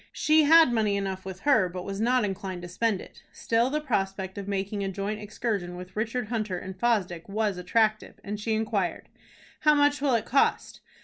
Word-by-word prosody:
She 310 0 +4
had 320 -4 +7
money 210 -3 +1
enough 190 -1 -4
with 190 -1 -7
her, 265 -11 +3
but 180 +1 -6
was 195 +1 -4
not 245 0 +2
inclined 190 -2 -5
to - - -6
spend 200 +2 -1
it. - - -14
Still 230 +2 +1
the 300 +2 0
prospect 195 -8 -2
of 200 - -7
making 200 +1 -2
a 195 - -2
joint 200 +3 -3
excursion 210 -4 -3
with 180 +1 -10
Richard 225 +1 -2
Hunter 215 -6 -2
and 190 +1 -7
Fosdick 190 -8 -1
was 205 -2 -1
attractive, 215 +4 0
and 205 +1 -5
she 220 +1 -1
inquired: 210 -4 -2 0.5
"How 300 -1 +4
much 290 0 +3
will 275 -4 +2
it 230 - -1
cost?" 275 +3 +1
210 Hz, 195 wpm, -27 LUFS, 190-235 Hz, 0.5 s, had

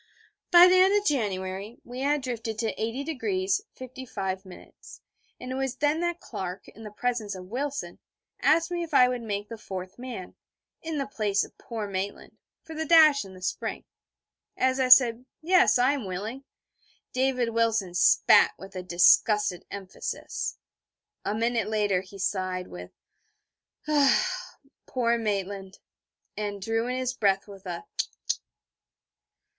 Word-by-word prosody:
By 350 0 +9
the 370 0 +5
end 385 +2 +5
of 410 - -11
January 200 - -2
we 245 +1 -8
had 285 +1 +1
drifted 230 -3 -4
to 225 -1 -1
80° 325 - -1 0.2
55'; 225 -7 -5
and 180 - -13 0.7
it 255 - -5
was 265 -1 -2
then 295 +3 +1
that 345 0 -1
Clark, 185 0 -6
in 220 - -15
the 215 - -7
presence 220 -1 -2
of 185 +1 -10
Wilson, 280 +3 -4 0.4
asked 335 +2 +3
me 350 0 -1
if 335 - -4
I 250 - +7
would 250 -1 -2
make 205 -2 -4
the 230 0 -8
fourth 185 0 -7
man, 245 -7 -7 0.5
in 325 -1 -4
the 275 - -1
place 210 -7 0
of - - -11
poor 225 -3 -5
Maitland, 195 +1 -5 0.3
for 320 - -9
the 320 0 -2
dash 310 -3 +6
in 190 -1 -12
the 185 - -13
spring. - - -3 0.7
As 260 +1 +2
I 260 - +2
said 250 -2 +7 0.2
'Yes, 370 +1 +4
I 250 +2 +4
am 275 -7 -4
willing,' 215 +9 -5 0.7
David 255 -2 +1
Wilson 225 -5 +1
spat 180 - +5
with 195 0 -12
a 185 - -3
disgusted 180 +2 +3
emphasis. 195 -2 -5 0.7
A 205 - -1
minute 230 -1 0
later 205 -4 +1
he 190 +1 -13
sighed, 185 -1 -2
with 90 0 -9 1.0
'Ah, 290 -3 +2 0.3
poor 235 -2 +1
Maitland...' 200 -2 -3 0.6
and 205 -1 -4
drew 225 +4 -1
in 250 +1 -2
his 255 -1 -1
breath 195 -4 +1
with 195 -1 -12
a 175 -1 -5
_tut! - - -2
230 Hz, 150 wpm, -27 LUFS, 195-270 Hz, 1.0 s, By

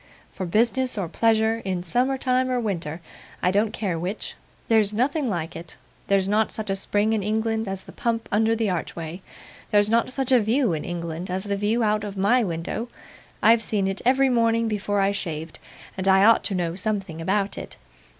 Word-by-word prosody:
For 185 - -5
business 235 +6 +1
or 190 -4 -1
pleasure, 225 +4 +2
in 185 -2 -2
summer 250 +9 +1
time 255 0 +1
or 250 -1 +1
winter 175 -7 -3 0.4
I 180 - +3
don't 205 +2 +2
care 185 -6 -2
which 185 +5 -4 0.3
there's 220 -3 +3
nothing 265 +5 0
like 170 -4 -3
it. 165 +1 -9 0.3
There's 195 -1 +2
not 215 +2 +2
such 215 -2 -4
a - - +1
spring 205 +2 0
in 220 - 0
England 220 +1 -1
as 195 0 -4
the - - -12
pump 230 -1 -2
under 220 +2 +3
the 225 -1 0
archway. 170 -1 -4 0.5
There's 205 0 +3
not 230 +2 +2
such 265 0 -1
a 255 - +6
view 225 -1 +1
in 155 - -3
England 170 +1 -5
as 185 +1 -2
the 200 -1 -2
view 210 +4 +1
out 210 -1 +1
of 200 -1 -6
my 230 +6 +3
window; 180 +6 -3 0.5
I've 225 +1 +6
seen 205 -3 0
it 195 0 -3
every 265 +2 +4
morning 230 -1 +2
before 205 -1 -1
I 195 0 +3
shaved, 165 -5 -5 0.4
and 190 0 -3
I 190 0 +6
ought 230 +1 +5
to 195 - 0
know 170 -2 -1
something 190 -4 -3
about 195 +3 0
it. - - -8
210 Hz, 200 wpm, -24 LUFS, 190-225 Hz, 0.5 s, a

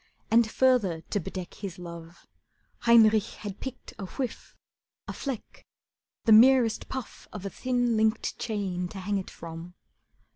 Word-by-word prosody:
And 230 0 +5
further 220 -11 +2
to 205 - +1
bedeck 185 0 -6
His 195 -4 -7
love, 170 -1 -10 0.5
Heinrich 220 -3 +4
had 200 -1 -5
picked 265 -1 -8
a 195 - -5
whiff, 255 +5 -5 0.5
a - - -4
fleck, 265 -6 -6 0.6
The 225 - +4
merest 235 +1 +6
puff 260 -3 -7
of 205 -2 -7
a 195 - -4
thin, 245 -2 0
linked 220 +1 +1
chain 195 -5 -2
To 195 - -10
hang 200 +1 -1
it 190 - -7
from. 165 +1 -9
210 Hz, 145 wpm, -28 LUFS, 180-235 Hz, 0.6 s, merest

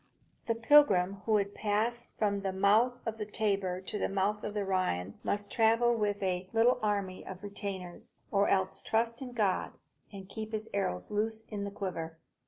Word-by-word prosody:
The 230 - +1
pilgrim 205 -7 +5
who 220 - +3
would 200 -1 +2
pass 220 +3 -1
from 200 -2 +1
the 195 -1 -1
mouth 215 +6 +3
of 225 -1 -3
the 210 - -2
Tiber 195 -4 -1
to 210 +2 -5
the - - 0
mouth 200 +2 0
of 210 - -4
the 205 -1 -1
Rhine 140 - -1
must 205 0 -2
travel 230 +1 +4
with 205 -2 -1
a 185 0 -1
little 235 +3 +4
army 200 -3 -1
of 190 +1 -9
retainers, 195 -3 -6 0.2
or 200 0 +3
else 190 -1 +1
trust 230 +2 0
in 250 -2 -6
God 205 -6 0 0.4
and 195 -2 -9
keep 220 +2 -6
his 215 0 -3
arrows 90 - -1
loose 220 +1 -1
in 205 -2 -3
the - - -3
quiver. 175 -5 -5
205 Hz, 185 wpm, -31 LUFS, 190-220 Hz, 0.4 s, pilgrim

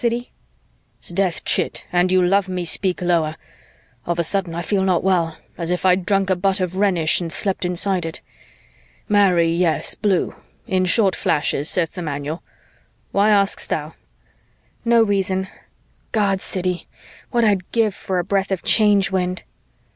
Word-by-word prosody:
Siddy!" 240 0 -2 0.7
"'Sdeath, 175 -1 -1
chit, - - 0
and 180 +1 +2
you 185 -1 +4
love 190 +1 +2
me, 180 -1 -3
speak 180 +2 +1
lower. 165 -3 +1 0.7
Of 170 -1 -1
a 170 - +1
sudden, 180 0 0
I 170 - -3
feel 200 +1 0
not 185 -3 +1
well, 175 -4 +1 0.2
as 170 -1 -3
if 180 +1 -2
I'd 185 -1 +2
drunk 195 -2 +1
a - - +3
butt 195 +2 0
of 185 -1 -2
Rhenish 185 -5 +2
and 165 -2 -4
slept 190 +2 -1
inside 180 0 +1
it. 160 - -7 0.9
Marry 190 -5 +3
yes, 165 -1 +2
blue. 195 -4 0 0.3
In 185 -4 0
short 190 0 +3
flashes, 150 0 0
saith 175 -3 +1
the 180 - -6
manual. 150 +1 -4 0.7
Why 200 +2 +3
ask'st 200 -1 +2
thou?" - - -3 0.9
"No 235 -1 +4
reason. 190 -2 -1 0.6
God, 200 -3 +1
Siddy, 180 -1 -3 0.4
what 240 -1 +1
I'd 195 -4 0
give 225 -3 +1
for 190 -1 -4
a 175 - 0
breath 195 +1 -1
of 190 -2 -3
Change 205 -3 +3
Wind." 185 -1 -2
185 Hz, 160 wpm, -20 LUFS, 175-200 Hz, 0.9 s, you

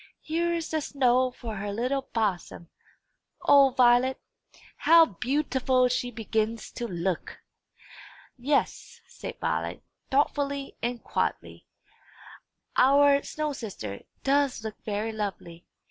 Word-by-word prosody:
"Here 340 +2 0
is 335 -1 -2
the 315 -1 0
snow 255 -3 +2
for 230 -3 -7
her 205 +1 -4
little 250 +6 -1
bosom. 185 -6 -2 0.7
O 280 -1 +6
Violet, 250 0 +3 0.6
how 330 0 +7
beau 270 - -1
ti 260 -3 -2
ful 255 -1 +3
she 245 0 -1
begins 225 -1 -2
to 240 - -5
look!" 175 -2 -3 1.0
"Yes," 280 +3 -1
said - - -8
Violet, - - -2 0.3
thoughtfully 280 0 0
and 240 0 -3
quietly; - - -3 1.1
"our 280 +1 +5
snow 305 0 -3
sister 200 - -7 0.2
does 275 -4 +1
look 220 -1 -7
very 215 +1 -2
lovely. 195 -5 -6
250 Hz, 115 wpm, -27 LUFS, 220-280 Hz, 1.1 s, how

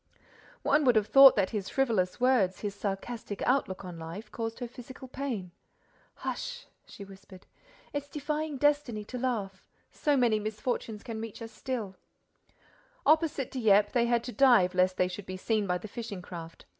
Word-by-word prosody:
One 305 - +3
would 250 -2 +5
have 215 -2 +4
thought 270 +3 +9
that 195 -3 +1
his 205 -4 -3
frivolous 225 -9 0
words, 240 -8 +2
his 205 -2 -3
sarcastic 205 +1 -4
outlook 240 -8 0
on 175 -2 -8
life, 170 +7 -8
caused 225 -1 -4
her 245 - -4
physical 255 +2 -11
pain. 245 -9 -4 0.6
"Hush!" - - -5 0.2
she 200 - -10
whispered. 190 -1 -14 0.5
"It's 285 -1 -3
defying 300 0 -3
destiny 285 -7 +1
to 250 +3 -6
laugh—so 235 +4 -2
many 235 -4 +3
misfortunes 215 0 -3
can 225 -2 -5
reach 225 -2 -7
us 225 -1 -8
still!" 225 -9 -5 1.1
Opposite 310 -4 +2
Dieppe, 210 -5 +4
they 235 -1 +3
had 235 -1 +2
to 245 - -5
dive 240 -10 +5
lest 185 0 +2
they 180 - +3
should 185 +2 -8
be 185 - -5
seen 215 +1 0
by 180 0 +1
the 180 - -8
fishing 210 -4 -6
craft. 165 -2 -9
225 Hz, 165 wpm, -29 LUFS, 195-255 Hz, 1.1 s, thought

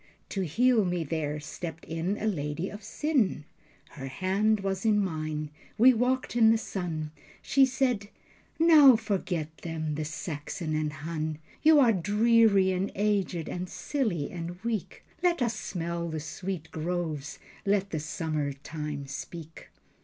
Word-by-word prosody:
To 195 - -2
heal 230 - +3
me 175 -2 -1
there 150 -1 -2
stepped 160 +2 -7
in 165 +5 -2
a - - -3
lady 165 -2 -2
of 210 - -8
sin. 215 - 0 0.5
Her 135 -4 -7
hand 195 +9 +1
was 195 -1 -2
in 215 -2 +4
mine. 155 -5 -2 0.3
We 255 +4 +7
walked 250 +2 0
in 225 -2 +6
the 225 - +5
sun. 165 -8 -4 0.3
She 270 -1 +4
said: 250 -6 0 0.5
"Now 310 -6 +8
forget 185 -7 -2
them, 160 -2 -3
the 155 +1 -2
Saxon 155 +1 -4
and 155 -1 0
Hun. 155 0 -4 0.2
You 310 -1 +7
are 240 -5 +6
dreary 210 0 +4
and 185 +2 -1
aged 195 -5 0
and 180 0 -4
silly 215 - -2
and 175 0 -6
weak. 230 -4 -3 0.2
Let 350 -2 +2
us 235 -3 0
smell 170 -3 -3
the 160 -1 -3
sweet 160 +1 -5
groves. 160 -2 -3 0.3
Let 200 -1 +1
the 155 - -1
summertime 150 -1 -3
speak." 160 +3 -8
180 Hz, 145 wpm, -28 LUFS, 155-215 Hz, 0.5 s, Now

